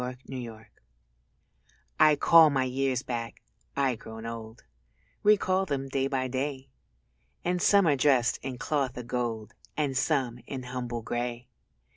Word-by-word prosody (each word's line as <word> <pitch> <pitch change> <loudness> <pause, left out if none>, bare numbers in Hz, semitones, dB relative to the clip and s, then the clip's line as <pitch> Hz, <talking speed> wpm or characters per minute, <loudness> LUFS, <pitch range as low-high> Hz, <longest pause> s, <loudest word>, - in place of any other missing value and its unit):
_ 125 0 -4
THE 125 -3 -6
DAYS 110 -1 -11 1.3
I 155 -1 +7
call 165 +2 +7
my 135 -2 +1
years 130 0 -1
back, 115 -2 -5 0.3
I, 135 -2 +2
grown 110 0 -9
old, 115 0 -8 0.6
Recall 195 -2 +3
them 135 -2 -2
day 135 0 0
by 130 -1 -1
day; 135 +1 -3 0.8
And 180 0 0
some 200 0 +5
are 150 -3 +4
dressed 130 -4 +3
in 130 -2 -5
cloth 135 -2 -1
o' 125 - -5
gold 115 -3 -3 0.2
And 145 -3 0
some 130 -3 0
in 130 -2 -5
humble 125 -2 -5
grey. 120 +1 -4
130 Hz, 145 wpm, -28 LUFS, 120-140 Hz, 1.3 s, I